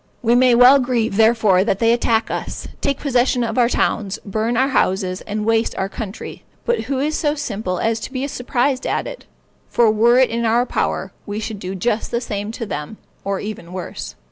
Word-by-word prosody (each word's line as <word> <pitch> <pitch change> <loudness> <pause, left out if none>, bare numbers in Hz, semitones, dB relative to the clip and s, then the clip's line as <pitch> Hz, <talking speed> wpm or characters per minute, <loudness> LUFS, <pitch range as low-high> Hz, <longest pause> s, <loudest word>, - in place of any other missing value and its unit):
We 235 0 +3
may 250 0 +5
well 250 +3 +7
grieve, 240 -5 0
therefore, 220 -4 +4
that 195 - 0
they 230 +2 +3
attack 230 -1 +1
us, - - -5
take 280 -1 0
possession 250 -2 +1
of 235 +2 -1
our 240 -1 +4
towns, 205 -5 0
burn 220 +3 -1
our 265 +2 +3
houses, 190 -7 0
and 210 0 -3
waste 225 0 +1
our 190 - -1
country. 205 0 -7 0.2
But 480 - 0
who 275 - -2
is 300 +3 0
so 295 -2 0
simple 210 -10 -3
as 225 +4 0
to - - -7
be 265 +1 -2
surprised 255 0 -1
at - - -1
it? - - -8 0.4
for 230 -2 +4
were 235 +3 +4
it 260 -2 +4
in 235 +1 -1
our 235 +2 +2
power, - - -2 0.2
we 205 +1 -3
should 215 -1 -5
do 190 0 -5
just 215 +4 -1
the 235 - -1
same 210 -3 -4
to 230 - -5
them, 150 +2 -6 0.3
or 195 -1 -2
even 190 -5 -7
worse. 185 -2 -6
230 Hz, 205 wpm, -20 LUFS, 205-250 Hz, 0.4 s, well